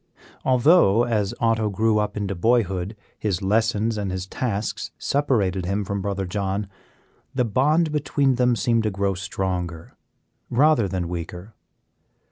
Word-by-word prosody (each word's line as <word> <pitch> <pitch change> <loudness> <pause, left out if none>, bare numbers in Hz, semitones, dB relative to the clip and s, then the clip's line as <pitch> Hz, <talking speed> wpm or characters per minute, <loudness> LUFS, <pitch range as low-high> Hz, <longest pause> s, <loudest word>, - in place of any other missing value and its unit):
Although, 130 - +5
as 110 -5 0
Otto 115 -2 +1
grew 110 +2 +2
up 105 0 -2
into 100 -1 -2
boyhood, 100 -1 +1 0.2
his 100 -4 -1
lessons 110 +2 +1
and 100 -2 -2
his 95 0 -3
tasks 105 +1 -3
separated 100 -11 0
him 100 +1 -1
from 100 0 -3
Brother 100 0 -2
John, 100 +2 -2 0.7
the 125 -2 +2
bond 150 +9 +2
between 145 -2 +1
them 125 -1 +2
seemed 115 +2 +1
to 110 - 0
grow 100 0 -1
stronger 90 -3 -4 0.5
rather 130 -3 +3
than 90 -2 -3
weaker. 90 +4 -6
105 Hz, 135 wpm, -23 LUFS, 95-120 Hz, 0.7 s, Although